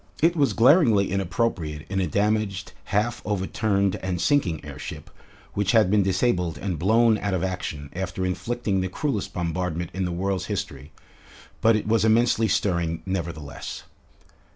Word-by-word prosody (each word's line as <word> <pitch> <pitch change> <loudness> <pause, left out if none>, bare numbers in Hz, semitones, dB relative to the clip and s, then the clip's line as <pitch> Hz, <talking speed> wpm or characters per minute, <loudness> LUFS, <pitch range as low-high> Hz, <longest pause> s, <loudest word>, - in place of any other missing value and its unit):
It 165 +2 +3
was 145 -4 +2
glaringly 115 - +5
inappropriate 95 -6 -1
in 95 -1 -1
a 90 - 0
damaged, 100 +1 0
half 110 +4 0
overturned, 100 0 0
and 90 -2 -3
sinking 90 - +1
airship, 70 -3 -8 0.4
which 100 -1 0
had 110 -5 +4
been 105 -1 +4
disabled 90 -4 +1
and 90 -1 -3
blown 110 +4 +4
out 100 -2 -1
of 90 - -1
action 80 -6 -4
after 95 0 -3
inflicting 100 +1 -1
the 95 - -2
cruellest 135 - -2
bombardment 85 0 -2
in 95 - -2
the 90 - -2
world's 95 +2 -1
history; 90 -9 -5 0.7
but 115 0 +5
it 105 - -2
was 110 0 +3
immensely 115 0 +3
stirring 85 -4 0
nevertheless. 85 -6 -5
95 Hz, 150 wpm, -25 LUFS, 90-110 Hz, 0.7 s, glaringly